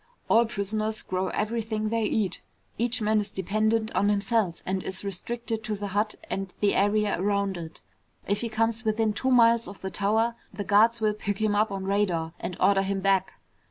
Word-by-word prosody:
All 230 +1 +5
prisoners 215 +1 -2
grow 185 0 -2
everything 215 +1 -2
they 225 0 0
eat. 205 -4 -1 0.4
Each 240 0 0
man 215 0 +3
is 205 - -5
dependent 215 +4 0
on 205 - +2
himself 205 -3 0
and 190 0 -1
is 190 +1 -4
restricted 225 +4 -4
to 215 - -2
the 205 0 -5
hut 210 +2 0
and 195 -1 -3
the 205 -1 +3
area 205 -2 +2
around 200 -1 0
it. 165 - -8 0.5
If 200 +1 0
he 235 - -2
comes 225 +1 0
within 220 -1 +1
two 260 +5 -1
miles 235 -2 +5
of 200 - -10
the 190 - -4
tower, 220 +5 +1 0.2
the 205 - -5
guards 225 +3 +4
will 215 -1 +2
pick 205 -1 -3
him 215 0 +1
up 210 +1 +2
on 195 -1 -4
radar 190 -5 0
and 180 - -5
order 195 +1 +4
him 195 0 -1
back. 190 -1 +2
210 Hz, 195 wpm, -27 LUFS, 195-220 Hz, 0.5 s, All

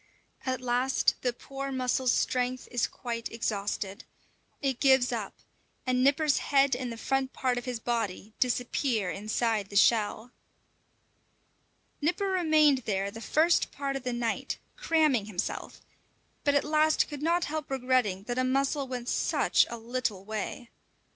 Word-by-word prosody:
At 255 -1 -1
last 250 +2 +2
the 250 - +1
poor 275 +3 -6
mussel's 255 -1 +1
strength 250 0 0
is 245 -2 +1
quite 235 -2 -5
exhausted. 205 -2 -3 0.6
It 270 -4 -1
gives 265 -3 +4
up, 220 -5 -4 0.5
and 255 0 +2
Nipper's 285 +2 +3
head 275 -2 +3
and 250 -1 -4
the 230 - -6
front 270 +2 -1
part 250 -2 0
of - - -10
his 250 -3 -3
body 220 -3 -3
disappear 245 -4 0
inside 215 0 -1
the 200 - -10
shell. 220 +2 +3 1.7
Nipper 350 +7 +1
remained 310 -6 +4
there 200 -4 -2
the 225 - -9
first 320 +8 +2
part 275 -1 -3
of 270 - -3
the 250 0 -3
night, 240 -2 -2 0.2
cramming 310 - +2
himself, 195 -5 -4 0.6
but 285 0 +2
at 285 - +3
last 310 +1 +3
could 290 -2 -7
not 340 +2 +2
help 310 0 -4
regretting 250 -7 +1
that 245 +3 -3
a - - +2
mussel 275 +2 +1
went 250 -2 -5
such - - +2
a 235 - -5
little 230 -4 -3
way. 220 +3 -5
250 Hz, 145 wpm, -29 LUFS, 230-275 Hz, 1.7 s, gives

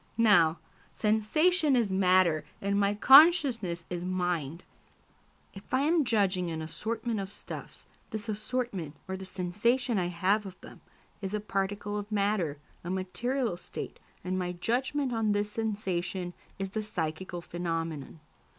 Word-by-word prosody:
Now, 175 -8 +5 0.3
sensation 285 - +2
is 230 -5 +2
matter 185 -4 +4 0.2
and 200 0 0
my 200 0 +2
consciousness 250 - +6
is 175 -1 -4
mind. 175 -4 -2 0.9
If 195 - -13
I 260 - +3
am 310 +1 +3
judging 195 -6 +1
an 160 -1 -3
assortment 220 +7 -3
of 195 0 -5
stuffs, - - -9 0.2
this 220 +1 -5
assortment, 215 - -3
or 190 - -3
the 190 0 -7
sensation 210 +6 0
I 175 - 0
have 190 +4 +1
of 185 - -11
them, - - -13 0.4
is 195 +1 -3
a - - 0
particle 205 0 -2
of 205 +1 -8
matter, 200 -7 +1 0.3
a 175 - -5
material 205 +4 -1
state, - - -7 0.2
and 185 +1 -1
my 180 -1 -2
judgment 255 +8 -1
on 220 -2 +1
this 205 0 -1
sensation 190 -5 -2 0.2
is 195 -1 -4
the 215 - -2
psychical 175 -3 -4
phenomenon. 165 -3 -4
200 Hz, 140 wpm, -29 LUFS, 180-225 Hz, 0.9 s, consciousness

